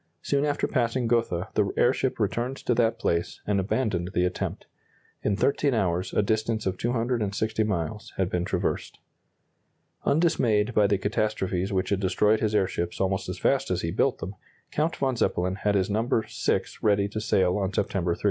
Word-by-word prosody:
Soon 140 +1 +1
after 145 -1 0
passing 120 -1 0
Gotha 115 -7 0
the - - +1
airship - - +2
returned 125 +3 -1
to 125 - 0
that 115 -1 +2
place, 85 -6 -1
and 100 -1 +1
abandoned 95 -3 -1
the 90 - +3
attempt. 90 - -3 0.6
In 105 - +1
13 140 +3 +2
hours 90 -3 0
a - - +2
distance 110 +1 0
of 95 -1 0
260 115 -2 0
miles 105 +3 -3
had 95 - +1
been 90 -1 -1
traversed. 90 -1 -2 1.1
Undismayed 125 -9 +2
by 105 -2 +4
the 100 - +2
catastrophes 100 -2 -1
which 95 0 0
had 100 - +1
destroyed 105 +3 +2
his 110 -1 0
airships 90 -3 -1
almost 95 0 0
as - - -4
fast - - +1
as - - 0
he - - -2
built - - +1
them, 90 +5 -6 0.4
Count 155 +3 0
von 135 -2 0
Zeppelin 90 -4 +1
had 100 +1 0
his 95 -2 +2
number 110 +2 0
VI - - 0 0.2
ready 100 -2 +3
to 110 +1 -4
sail 90 -4 +2
on 95 -1 -1
September 90 -3 0
3. - - -18
105 Hz, 175 wpm, -26 LUFS, 95-115 Hz, 1.1 s, by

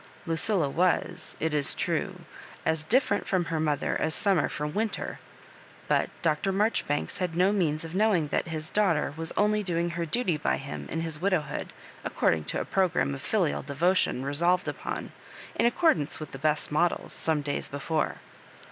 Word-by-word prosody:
Lucilla 165 0 +1
was, 180 +2 0
it 160 0 0
is 145 -2 +1
true, - - -2 0.4
as 160 -1 +1
different 210 - +2
from 185 -3 +1
her 165 -1 -2
mother 150 -2 0
as 160 - +3
summer 195 -6 +3
fbom 150 0 -4
winter; 220 0 -2 0.7
but - - +2
Dr. 165 +4 +1
Mar 210 +4 +2
joribanks 145 -8 -1
had 180 -3 -2
no 185 +3 +4
means 160 -5 +1
of 165 - -7
knowmg 185 -6 +2
that - - 0
his 155 -1 -1
daughter 165 -9 +2
was 165 0 -2
only 210 0 +3
domg 170 -2 -1
her 170 0 -3
duty 185 -4 +1
by 65 - 0
him 70 0 -6
m 165 - -2
his 160 -2 -3
widowhood, 180 -7 -1 0.3
according 80 -2 +1
to - - -2
a - - -2
programme 165 - +1
of 70 - -6
filial 70 - 0
devotion 145 -1 +1
resolved 170 +6 +1
upon, - - -4 0.4
in 235 - +3
accordance 240 - +2
with 155 -2 -7
the 135 - -8
best 150 +1 +1
models, 170 +4 +1
some 155 -2 0
days 145 0 -2
before. 145 +3 -1
165 Hz, 175 wpm, -28 LUFS, 150-185 Hz, 0.7 s, no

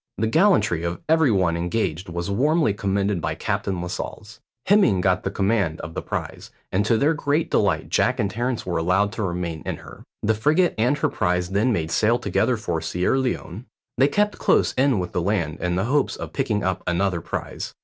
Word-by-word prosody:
The 110 - 0
gallantry 110 - +3
of 85 0 -3
every 160 -2 +4
one 95 -6 +2
engaged 85 0 -2
was 85 0 -4
warmly 150 +2 +2
commended 100 -2 -1
by - - -2
Captain 95 -2 -2
Lascelles. 105 +4 -6 0.3
Hemming 195 - +4
got 95 0 +2
the - - -2
command 100 -5 0
of 80 - -7
the - - -3
prize, - - -5 0.2
and 95 +2 +2
to 115 - +3
their 145 +7 +3
great 150 +1 -1
delight 95 -7 +1
Jack - - +1
and - - +2
Terence 120 +2 -2
were 85 -2 -1
allowed 95 +5 +2
to 115 - -5
remain 85 -4 -3
in - - -3
her. - - -13 0.2
The 110 - +3
frigate 155 - +2
and 125 +6 +1
her - - +1
prize 90 0 -1
then 105 +6 +2
made 80 -7 -1
sail 110 +7 +3
together 125 0 0
for 85 -7 -3
Sierra 90 +10 0
Leone. 125 -4 -3 0.3
They 135 +3 +4
kept 210 +6 0
close - - +2
in 135 -2 +2
with 90 -2 -3
the 90 - -1
land 85 -5 -1
in 90 -1 -1
the 95 +3 0
hopes 140 +3 +1
of - - -7
picking 115 -7 -1
up 95 0 -1
another 90 0 0
prize. - - -5
100 Hz, 200 wpm, -23 LUFS, 90-125 Hz, 0.3 s, every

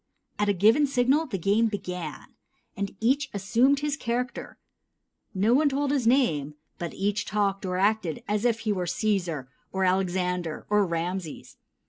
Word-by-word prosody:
At 210 0 +2
a - - +4
given 220 +10 +4
signal 270 +4 +2
the 215 -7 -3
game 205 +6 +2
began, 180 -8 -6 0.4
and 200 0 -4
each 265 +5 +1
assumed 240 +9 +2
his 295 -1 -1
character. 250 -1 -3 0.8
No 205 +5 +3
one 290 +3 +4
told 280 0 0
his 270 -5 +1
name, 155 - +2 0.2
but 170 -1 -5
each 205 +2 0
talked 200 -2 -1
or 180 0 -1
acted 200 -4 0
as 210 +1 0
if 230 -2 +1
he 215 -2 0
were 180 -2 -2
Cæsar, 175 - -1 0.3
or 190 0 -1
Alexander, 180 -3 -1
or 210 -2 +3
Rameses. 170 0 -4
205 Hz, 155 wpm, -26 LUFS, 180-245 Hz, 0.8 s, a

